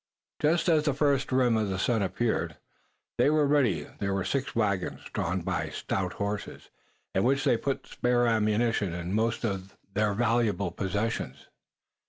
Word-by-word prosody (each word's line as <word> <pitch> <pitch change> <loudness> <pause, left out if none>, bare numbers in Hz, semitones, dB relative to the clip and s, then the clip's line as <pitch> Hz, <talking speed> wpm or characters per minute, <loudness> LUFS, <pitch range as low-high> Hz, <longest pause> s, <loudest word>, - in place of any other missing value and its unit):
Just 165 +3 +2
as 155 -3 +4
the 145 -4 +1
first 140 -2 +1
rim 125 -3 +3
of 110 -2 +1
the 95 - -2
sun 110 +3 +1
appeared 110 +4 -1 0.6
they - - +5
were 155 -1 +3
ready. 125 - +2
There 100 -1 -1
were 95 - -1
six 135 -1 -2
wagons, 100 -5 0
drawn - - -1
by - - -2
stout 95 -1 -2
horses, 100 0 -4 0.4
in 95 - +2
which 135 +2 +2
they 135 -5 +4
put 135 +4 -2
the - - -19
spare 120 0 +2
ammunition 110 -3 +1
and 90 0 -4
their 95 - -1 1.0
most - - -6
valuable 115 -6 +1
possessions. 100 +5 -3
115 Hz, 160 wpm, -28 LUFS, 100-135 Hz, 1.0 s, they